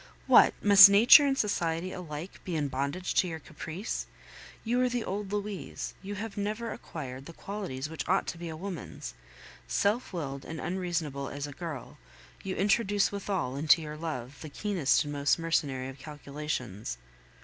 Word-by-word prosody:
What! -, -, +6 dB
must 200 Hz, -1 st, +11 dB
nature 235 Hz, +8 st, +8 dB
and 270 Hz, -1 st, +1 dB
society 175 Hz, -4 st, 0 dB
alike 170 Hz, -1 st, -7 dB
be 180 Hz, -4 st, -4 dB
in 145 Hz, -2 st, 0 dB
bondage 140 Hz, +7 st, -2 dB
to 185 Hz, -, +3 dB
your 165 Hz, -2 st, -4 dB
caprice? 160 Hz, +6 st, -5 dB, 0.6 s
You 240 Hz, +2 st, +1 dB
are 250 Hz, -, +3 dB
the 245 Hz, -2 st, -1 dB
old 200 Hz, 0 st, -4 dB
Louise; 205 Hz, -2 st, -4 dB
you 200 Hz, +2 st, -6 dB
have 210 Hz, +1 st, -6 dB
never 215 Hz, +3 st, -2 dB
acquired 135 Hz, -4 st, -8 dB
the 170 Hz, -, -9 dB
qualities 180 Hz, -10 st, -5 dB
which 160 Hz, +1 st, -6 dB
ought 190 Hz, -, +3 dB
to 170 Hz, -, -6 dB
be 170 Hz, -1 st, -5 dB
a 160 Hz, -, -6 dB
woman's; 180 Hz, -, -6 dB, 0.5 s
self 210 Hz, +5 st, 0 dB
willed 140 Hz, -7 st, -4 dB
and 160 Hz, 0 st, -7 dB
unreasonable 170 Hz, -7 st, -2 dB
as 145 Hz, 0 st, -5 dB
a 145 Hz, -, -8 dB
girl, 155 Hz, -5 st, -7 dB, 0.4 s
you 190 Hz, -1 st, -4 dB
introduce 205 Hz, 0 st, +2 dB
withal 190 Hz, -10 st, -2 dB
into 155 Hz, +3 st, +5 dB
your 150 Hz, -1 st, -6 dB
love 145 Hz, -5 st, -5 dB
the 155 Hz, -, -7 dB
keenest 180 Hz, -3 st, +1 dB
and 145 Hz, -1 st, -5 dB
most 145 Hz, 0 st, +2 dB
mercenary 145 Hz, -6 st, -1 dB
of 135 Hz, 0 st, -11 dB
calculations! 140 Hz, -, -5 dB
165 Hz, 170 wpm, -29 LUFS, 145-200 Hz, 0.6 s, must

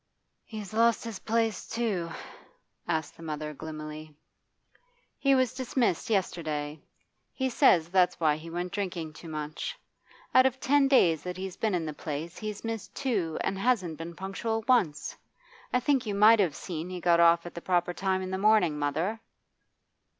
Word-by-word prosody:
'He's 215 Hz, -3 st, -8 dB
lost 230 Hz, +1 st, +3 dB
his 230 Hz, -4 st, -6 dB
place 225 Hz, -2 st, 0 dB
too?' 210 Hz, -8 st, -1 dB, 0.8 s
asked 160 Hz, -2 st, -2 dB
the -, -, -13 dB
mother 155 Hz, -1 st, -4 dB
gloomily. 155 Hz, 0 st, -8 dB, 1.0 s
'He 275 Hz, -1 st, +4 dB
was 255 Hz, -2 st, +2 dB
dismissed 250 Hz, -7 st, 0 dB
yesterday. 155 Hz, -7 st, -1 dB, 0.5 s
He 260 Hz, -1 st, -2 dB
says 180 Hz, -, +5 dB
that's 185 Hz, -1 st, +3 dB
why 155 Hz, -3 st, +3 dB
he 160 Hz, +2 st, -9 dB
went 175 Hz, +2 st, -3 dB
drinking 175 Hz, -6 st, -3 dB
too 165 Hz, +1 st, -11 dB
much. 155 Hz, -, -5 dB, 0.6 s
Out 255 Hz, 0 st, +7 dB
of 265 Hz, 0 st, -4 dB
ten 280 Hz, +1 st, +3 dB
days 170 Hz, -, +4 dB
that 180 Hz, 0 st, -5 dB
he's 190 Hz, -1 st, -5 dB
been 215 Hz, -4 st, 0 dB
in 170 Hz, -2 st, -1 dB
the 155 Hz, -, -4 dB
place 155 Hz, +3 st, -5 dB
he's 210 Hz, -1 st, -5 dB
missed 225 Hz, -2 st, -5 dB
two 195 Hz, -, -1 dB
and 195 Hz, -, -2 dB
hasn't 195 Hz, -9 st, +1 dB
been 165 Hz, +1 st, -7 dB
punctual 220 Hz, +4 st, -3 dB
once. 175 Hz, -, +2 dB, 0.6 s
I 250 Hz, -, +3 dB
think 260 Hz, -2 st, +1 dB
you 205 Hz, -, -1 dB
might 215 Hz, +2 st, +7 dB
have 175 Hz, -7 st, +2 dB
seen 170 Hz, -1 st, -5 dB
he 180 Hz, -1 st, -5 dB
got 170 Hz, 0 st, +3 dB
off 170 Hz, 0 st, +5 dB
at 175 Hz, -, -8 dB
the 170 Hz, -, -7 dB
proper 175 Hz, -1 st, +1 dB
time 190 Hz, 0 st, -1 dB
in 185 Hz, -, -5 dB
the 190 Hz, -, -2 dB
morning, 195 Hz, -7 st, +3 dB
mother. 160 Hz, +10 st, -1 dB
185 Hz, 170 wpm, -28 LUFS, 160-225 Hz, 1.0 s, Out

